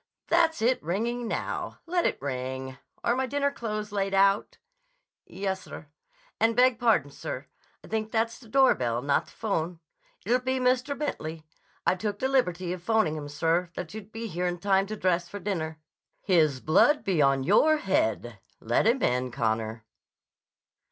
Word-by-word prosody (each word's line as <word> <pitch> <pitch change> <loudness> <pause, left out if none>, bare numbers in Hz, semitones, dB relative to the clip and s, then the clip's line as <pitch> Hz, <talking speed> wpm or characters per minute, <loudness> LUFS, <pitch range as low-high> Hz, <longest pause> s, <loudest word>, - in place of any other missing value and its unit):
That's 320 -7 +3
it 250 +2 +2
ringing 230 +8 -2
now. - - -3
Let 350 +1 +1
it - - -2
ring. 130 -1 -4 0.2
Are 235 - +2
my 260 0 0
dinner 280 +2 0
clothes 215 -5 -4
laid 195 -1 -1
out?" 195 +1 +3 0.7
"Yes, 190 -1 -3
sir. - - -10 0.5
And, 225 0 +3
beg 250 -1 +4
pardon, 225 - +2
sir; 135 -1 -6 0.4
I - - -12
think 220 0 -2
that's 230 0 0
the 235 -4 -16
doorbell 125 - +3
not 140 0 +1
the'phone. 175 -6 -3 0.5
It'll 245 +4 +3
be 260 +1 -1
Mr. 255 +3 +1
Bentley. 160 - -4 0.4
I - - +4
took 205 +2 -3
the 260 - 0
liberty 180 -10 +1
of 180 - -7
'phoning 205 -5 +2
him, 145 -2 -6
sir, 165 +4 0
that 180 - -6
you'd 215 -1 -9
be 225 +1 -6
here 180 -3 -2
in 175 0 -2
time 195 +2 +2
to 215 - -4
dress 180 -3 0
for 205 - -6
dinner—" 160 -6 -3 0.4
"His 155 -8 +3
blood 290 - +4
be 180 -6 +1
on 135 -1 +3
your 310 - +4
head. 120 - 0 0.2
Let 120 - +1
him 245 +3 +2
in, 125 +1 +1
Connor." 110 -2 -2
195 Hz, 165 wpm, -27 LUFS, 155-235 Hz, 0.7 s, beg